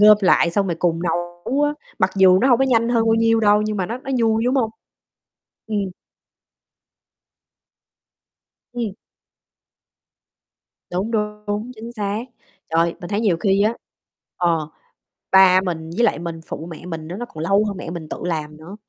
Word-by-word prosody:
gom 210 Hz, 0 st, +8 dB
lại 185 Hz, -3 st, +4 dB
xong 200 Hz, +2 st, +1 dB
rồi 170 Hz, -3 st, -2 dB
cùng 165 Hz, -2 st, +1 dB
nấu 175 Hz, -, -2 dB
á, 295 Hz, 0 st, +2 dB, 0.3 s
mặc 185 Hz, -, +2 dB
dù 185 Hz, -1 st, +6 dB
nó 255 Hz, -, +3 dB
hông 245 Hz, -3 st, +5 dB
có 270 Hz, -, +3 dB
nhanh 230 Hz, -3 st, +2 dB
hơn 235 Hz, -2 st, +2 dB
bao 225 Hz, -, +4 dB
nhiêu 225 Hz, 0 st, +3 dB
đâu 210 Hz, -1 st, +4 dB
nhưng 215 Hz, 0 st, -2 dB
mà 185 Hz, -2 st, -1 dB
nó 235 Hz, +5 st, -4 dB
nó 270 Hz, -, -8 dB
vui, 225 Hz, -1 st, +2 dB
đúng 250 Hz, +2 st, +1 dB
hông? 240 Hz, -5 st, +1 dB, 1.0 s
Ừm. 215 Hz, -2 st, -1 dB, 2.9 s
Ừm. 235 Hz, -5 st, -3 dB, 2.0 s
Đúng, 190 Hz, +5 st, -2 dB
đúng, 210 Hz, -1 st, -2 dB
đúng, 210 Hz, +4 st, -3 dB
chính 230 Hz, +1 st, -9 dB
xác. 210 Hz, -1 st, -3 dB, 0.5 s
Trời, 165 Hz, +1 st, +2 dB
mình 175 Hz, -, -7 dB
thấy 205 Hz, +1 st, -1 dB
nhiều 205 Hz, -7 st, +2 dB
khi 195 Hz, +2 st, +2 dB
á, 220 Hz, +2 st, +2 dB, 0.6 s
ờ, 165 Hz, -3 st, 0 dB, 0.6 s
ba 190 Hz, -1 st, +7 dB
mình 165 Hz, -4 st, -4 dB
với 240 Hz, -, +3 dB
lại 190 Hz, -, +2 dB
mình 170 Hz, -1 st, -6 dB
phụ 160 Hz, -, -6 dB
mẹ 165 Hz, -, -9 dB
mình 160 Hz, -3 st, -6 dB
đó 175 Hz, -, -5 dB
nó 240 Hz, -, -4 dB
còn 155 Hz, +1 st, -6 dB
lâu 195 Hz, +4 st, +3 dB
hơn 205 Hz, -2 st, -3 dB
mẹ 175 Hz, -, -6 dB
mình 165 Hz, -2 st, -7 dB
tự -, -, -5 dB
làm 155 Hz, -3 st, -3 dB
nữa. 165 Hz, +6 st, -11 dB
200 Hz, 180 wpm, -21 LUFS, 175-225 Hz, 2.9 s, gom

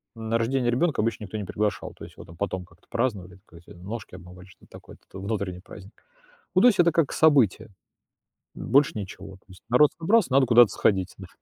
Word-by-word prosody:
На 115 Hz, 0 st, -2 dB
рождение 120 Hz, +1 st, 0 dB
ребёнка 145 Hz, +1 st, 0 dB
обычно 110 Hz, -1 st, -2 dB
никто 105 Hz, +3 st, -7 dB
не 105 Hz, -, -4 dB
приглашал, 105 Hz, +2 st, -3 dB
то -, -, -14 dB
есть -, -, -12 dB
его -, -, -11 dB
там 85 Hz, 0 st, -15 dB
потом 95 Hz, -2 st, -4 dB
как-то 85 Hz, -1 st, -26 dB
праздновали, 100 Hz, -7 st, -3 dB
ка 85 Hz, -, -17 dB
эти 85 Hz, -, -18 dB
"ножки 95 Hz, +3 st, -9 dB
обмывали", 90 Hz, 0 st, -13 dB
что-то 95 Hz, -, -21 dB
такое -, -, -13 dB
это -, -, -29 dB
т 95 Hz, -, -11 dB
внутренний 100 Hz, -3 st, -4 dB
праздник. 100 Hz, +2 st, -13 dB, 0.6 s
Ну, 185 Hz, -, +4 dB
то 250 Hz, -, +8 dB
есть 205 Hz, -, +2 dB
это 170 Hz, -2 st, +4 dB
как 165 Hz, -5 st, +1 dB
событие. 125 Hz, -, +3 dB, 0.9 s
М, -, -, -8 dB
больше 140 Hz, +2 st, +4 dB
ничего, 95 Hz, -1 st, -8 dB
то -, -, -33 dB
есть 95 Hz, -1 st, -17 dB
народ 125 Hz, +5 st, +5 dB
собрался, 200 Hz, -, +2 dB
надо 135 Hz, 0 st, +4 dB
куда-то 120 Hz, -2 st, +6 dB
сходить, 95 Hz, -2 st, 0 dB
да. -, -, -11 dB
110 Hz, 215 wpm, -25 LUFS, 95-130 Hz, 0.9 s, то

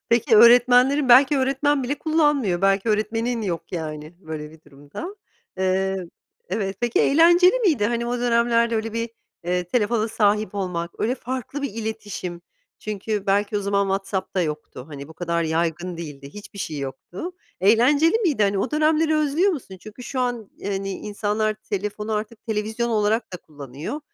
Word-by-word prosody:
Peki 235 Hz, 0 st, +4 dB
öğretmenlerin, 250 Hz, +4 st, +6 dB
belki 270 Hz, +3 st, +7 dB
öğretmen 275 Hz, +1 st, +1 dB
bile 280 Hz, +4 st, -2 dB
kullanmıyor, 295 Hz, -, +1 dB
belki 195 Hz, +2 st, +2 dB
öğretmenin 225 Hz, +2 st, 0 dB
yok, 175 Hz, -3 st, -4 dB
yani, 155 Hz, -1 st, -5 dB
böyle 155 Hz, -3 st, -7 dB
bir 160 Hz, 0 st, -17 dB
durumda. 145 Hz, -, -9 dB, 0.4 s
Iıı, 190 Hz, -1 st, 0 dB, 0.4 s
evet 195 Hz, -2 st, -2 dB
peki 240 Hz, -1 st, +1 dB
eğlenceli 345 Hz, -, +5 dB
miydi? 320 Hz, -, +2 dB
Hani 235 Hz, +1 st, -1 dB
o 245 Hz, +1 st, -2 dB
dönemlerde 235 Hz, -1 st, +2 dB
öyle 220 Hz, 0 st, -3 dB
bir, 230 Hz, 0 st, -3 dB, 0.3 s
eee, 180 Hz, 0 st, 0 dB
telefona 220 Hz, +3 st, 0 dB
sahip 210 Hz, -2 st, +1 dB
olmak 180 Hz, -4 st, -3 dB
öyle 240 Hz, +4 st, +1 dB
farklı 260 Hz, +2 st, -5 dB
bir 280 Hz, -, -3 dB
iletişim. 210 Hz, -6 st, -5 dB, 0.4 s
Çünkü 210 Hz, -1 st, -4 dB
belki 205 Hz, +1 st, +1 dB
o -, -, -3 dB
zaman 200 Hz, 0 st, +1 dB
WhatsApp'da 195 Hz, -1 st, -2 dB
yoktu. 150 Hz, -4 st, -5 dB
Hani, 140 Hz, -1 st, -9 dB
bu -, -, -11 dB
kadar 170 Hz, -1 st, -1 dB
yaygın 170 Hz, +2 st, -1 dB
değildi 145 Hz, -4 st, -8 dB
hiçbir 205 Hz, -1 st, -11 dB
şey 155 Hz, -5 st, -4 dB
yoktu, 140 Hz, -, -6 dB, 0.3 s
eğlenceli 275 Hz, -, +4 dB
miydi? 315 Hz, -, +1 dB
Hani 200 Hz, -1 st, +2 dB
o 200 Hz, -, -1 dB
dönemleri 310 Hz, +1 st, +2 dB
özlüyor 305 Hz, +6 st, +2 dB
musun? 225 Hz, -, -7 dB
Çünkü 215 Hz, +3 st, -11 dB
şu 255 Hz, +1 st, -4 dB
an, 240 Hz, -4 st, -2 dB
hani, 195 Hz, 0 st, -2 dB
insanlar 210 Hz, +2 st, -2 dB
telefonu 210 Hz, +1 st, -4 dB
artık 215 Hz, +1 st, -4 dB
televizyon 220 Hz, +2 st, -2 dB
olarak 215 Hz, 0 st, 0 dB
da -, -, -3 dB
kullanıyor, 145 Hz, -, -8 dB
215 Hz, 155 wpm, -23 LUFS, 185-245 Hz, 0.4 s, belki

